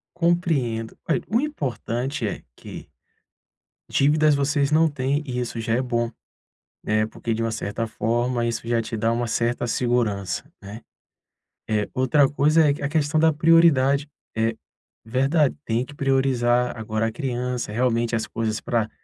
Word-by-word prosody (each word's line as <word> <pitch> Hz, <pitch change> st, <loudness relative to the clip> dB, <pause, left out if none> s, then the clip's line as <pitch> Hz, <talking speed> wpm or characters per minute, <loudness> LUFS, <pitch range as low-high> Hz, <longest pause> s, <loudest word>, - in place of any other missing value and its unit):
Compreendo, 160 Hz, -10 st, 0 dB
a, 160 Hz, -, +3 dB
eh, -, -, -2 dB
o 225 Hz, +3 st, +2 dB
importante 135 Hz, -, -3 dB
é 105 Hz, -, -4 dB
que: -, -, -10 dB, 1.0 s
dívidas 150 Hz, +2 st, +3 dB
vocês 140 Hz, 0 st, +1 dB
não 160 Hz, +1 st, +4 dB
têm 140 Hz, 0 st, -1 dB
e 125 Hz, -2 st, -3 dB
isso 120 Hz, -1 st, -4 dB
já 115 Hz, 0 st, -1 dB
é 125 Hz, -, +1 dB
bom, 120 Hz, -2 st, -1 dB, 0.7 s
né, 110 Hz, 0 st, +1 dB
porque 115 Hz, +1 st, -4 dB
de 110 Hz, -, -2 dB
uma 115 Hz, 0 st, 0 dB
certa 110 Hz, +1 st, -3 dB
forma 120 Hz, +2 st, -1 dB
isso 115 Hz, 0 st, -3 dB
já 115 Hz, -1 st, +1 dB
te 115 Hz, -, -5 dB
dá 110 Hz, +1 st, +1 dB
uma 120 Hz, +1 st, -1 dB
certa 120 Hz, +2 st, 0 dB
segurança, 120 Hz, -, -1 dB
né? 105 Hz, +4 st, -9 dB, 0.9 s
Eh, 105 Hz, -1 st, 0 dB
outra 135 Hz, +2 st, +3 dB
coisa 150 Hz, +2 st, +3 dB
é 140 Hz, 0 st, -1 dB
a 140 Hz, -, 0 dB
questão 155 Hz, 0 st, +1 dB
da 160 Hz, 0 st, +5 dB
prioridade. 145 Hz, -3 st, +4 dB, 0.3 s
É 110 Hz, 0 st, 0 dB, 0.5 s
verdade. 135 Hz, +5 st, +2 dB
Tem 115 Hz, +2 st, 0 dB
que 145 Hz, -, -13 dB
priorizar 125 Hz, -3 st, +1 dB
agora 110 Hz, 0 st, -1 dB
a 115 Hz, -, -3 dB
criança, 125 Hz, -1 st, -3 dB
realmente 120 Hz, 0 st, +1 dB
as 110 Hz, -, -2 dB
coisas 110 Hz, -1 st, -2 dB
pra 115 Hz, -2 st, -1 dB
125 Hz, 160 wpm, -23 LUFS, 115-145 Hz, 1.0 s, da